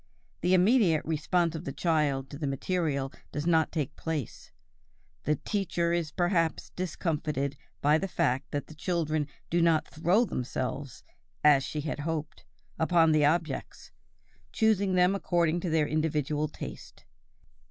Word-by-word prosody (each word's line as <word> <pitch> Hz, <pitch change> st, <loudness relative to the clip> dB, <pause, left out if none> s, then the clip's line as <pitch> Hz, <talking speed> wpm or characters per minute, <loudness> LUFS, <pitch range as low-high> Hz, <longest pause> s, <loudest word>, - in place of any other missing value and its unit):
The 180 Hz, +2 st, +4 dB
immediate 185 Hz, -, +4 dB
response 165 Hz, +2 st, +1 dB
of 160 Hz, 0 st, -5 dB
the 135 Hz, -, -4 dB
child 145 Hz, -5 st, 0 dB
to 140 Hz, -, -8 dB
the 150 Hz, -, -2 dB
material 140 Hz, -1 st, -1 dB, 0.2 s
does 150 Hz, +1 st, -3 dB
not 160 Hz, -2 st, +3 dB
take 150 Hz, -5 st, -3 dB
place; 155 Hz, -7 st, -4 dB, 0.8 s
the 150 Hz, -, +2 dB
teacher 170 Hz, -1 st, -1 dB
is 170 Hz, -3 st, 0 dB
perhaps 175 Hz, -2 st, 0 dB
discomfited 150 Hz, -5 st, -2 dB, 0.3 s
by 150 Hz, +2 st, +4 dB
the 195 Hz, -, -2 dB
fact 145 Hz, -8 st, 0 dB
that 145 Hz, -, -3 dB
the -, -, -12 dB
children 155 Hz, -2 st, -1 dB, 0.2 s
do 170 Hz, +1 st, +3 dB
not 165 Hz, -2 st, +3 dB
throw 180 Hz, +9 st, +2 dB
themselves, 130 Hz, -, -4 dB, 0.4 s
as 145 Hz, -3 st, +6 dB
she 150 Hz, +2 st, -3 dB
had 150 Hz, 0 st, -4 dB
hoped, 155 Hz, 0 st, -4 dB, 0.3 s
upon 165 Hz, 0 st, +4 dB
the 155 Hz, -1 st, +4 dB
objects, 160 Hz, +2 st, -1 dB, 0.6 s
choosing 200 Hz, -4 st, +2 dB
them 180 Hz, +1 st, +4 dB
according 175 Hz, -3 st, +1 dB
to 175 Hz, -, -3 dB
their 160 Hz, -1 st, +2 dB
individual 150 Hz, -1 st, 0 dB
taste. 150 Hz, -, -9 dB
160 Hz, 140 wpm, -29 LUFS, 150-175 Hz, 0.8 s, as